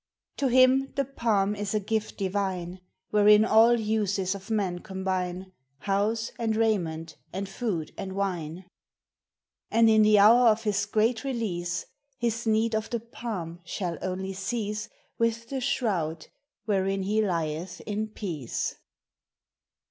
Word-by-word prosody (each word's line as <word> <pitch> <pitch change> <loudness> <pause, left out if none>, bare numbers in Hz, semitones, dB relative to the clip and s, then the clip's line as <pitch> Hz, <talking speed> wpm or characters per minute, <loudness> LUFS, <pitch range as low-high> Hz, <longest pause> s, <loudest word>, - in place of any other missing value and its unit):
To 280 - +1
him 260 +2 +4
the 275 - +1
palm 220 -6 +1
is 205 0 -3
a - - +3
gift 215 +1 -2
divine, 190 -2 -2 0.3
Wherein 210 +1 +6
all 230 +2 +5
uses 205 -3 0
of 195 +1 -9
man 195 -5 0
combine, 185 -1 -3
— 135 +1 -47
House 220 +3 0
and 225 -2 0
raiment 175 -8 0
and 195 +2 -4
food 195 -6 -3
and 190 -1 -4
wine! 180 -3 -3 1.0
And, 225 0 +5
in 220 0 +6
the 215 0 +6
hour 230 +4 +7
of 220 0 +3
his 200 -1 0
great 220 +2 +1
release, 185 -10 -2 0.3
His 235 -1 -1
need 220 +1 +2
of 220 0 -1
the 235 - -1
palm 210 -7 -6
shall 175 -1 -4
only 190 +1 -3
cease 210 +1 -3 0.3
With 230 0 0
the 270 -1 -3
shroud 185 - -1 0.4
wherein 195 -2 0
he 210 +3 +1
lieth 170 -2 -2
in 215 +1 -3
peace. 170 - -4
205 Hz, 140 wpm, -27 LUFS, 185-225 Hz, 1.0 s, hour